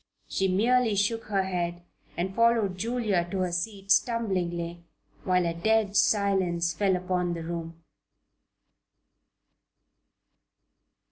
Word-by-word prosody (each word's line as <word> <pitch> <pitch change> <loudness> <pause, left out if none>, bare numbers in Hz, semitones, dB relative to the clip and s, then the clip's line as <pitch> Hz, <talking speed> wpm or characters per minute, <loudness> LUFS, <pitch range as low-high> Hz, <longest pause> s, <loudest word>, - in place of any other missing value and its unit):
She 195 - 0
merely 225 +4 +2
shook 220 +3 0
her 200 -2 0
head 175 -2 -3 0.3
and 185 +2 -2
followed 230 -5 +3
Julia 215 -4 -1
to 190 +1 -2
her 180 -1 -1
seat, 195 +3 -3
stumblingly, 175 -7 0 0.4
while 180 -1 +2
a 170 - 0
dead 210 +3 +1
silence 190 -5 +2
fell 195 -2 +1
upon 180 -1 -1
the 165 - -6
room. 165 0 -6
190 Hz, 110 wpm, -27 LUFS, 175-210 Hz, 0.4 s, followed